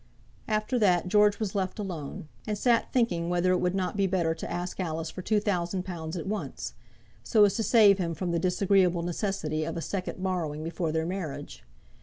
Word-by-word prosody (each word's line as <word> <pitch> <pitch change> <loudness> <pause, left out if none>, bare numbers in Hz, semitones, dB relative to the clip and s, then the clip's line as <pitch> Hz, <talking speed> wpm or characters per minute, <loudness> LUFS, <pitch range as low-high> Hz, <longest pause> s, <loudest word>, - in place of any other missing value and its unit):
After 215 +3 0
that 180 -4 +3
George 210 +1 +4
was 215 -4 -2
left 190 0 -2
alone, 170 -8 -5 0.2
and 210 -1 -1
sat 235 +1 +2
thinking 175 -9 +1
whether 175 +1 +2
it 180 - +3
would 180 +1 0
not 185 0 -1
be 200 -1 +2
better 175 -3 +1
to 160 - -7
ask 175 +2 -4
Alice 160 -3 -2
for 185 - -7
two 215 +3 +2
thousand 185 -3 -1
pounds 165 -2 -5
at 165 - -4
once, 210 +2 -4 0.5
so 215 -3 +5
as 200 - +2
to - - 0
save 210 -3 +6
him 165 -2 -1
from 180 0 -2
the 170 - +1
disagreeable 180 -1 +2
necessity 170 -3 -2
of 165 +1 -4
a - - -2
second 185 0 -4
borrowing 165 -5 -2
before 165 0 -2
their 160 0 0
marriage. 160 -6 -5
180 Hz, 200 wpm, -28 LUFS, 170-200 Hz, 0.5 s, save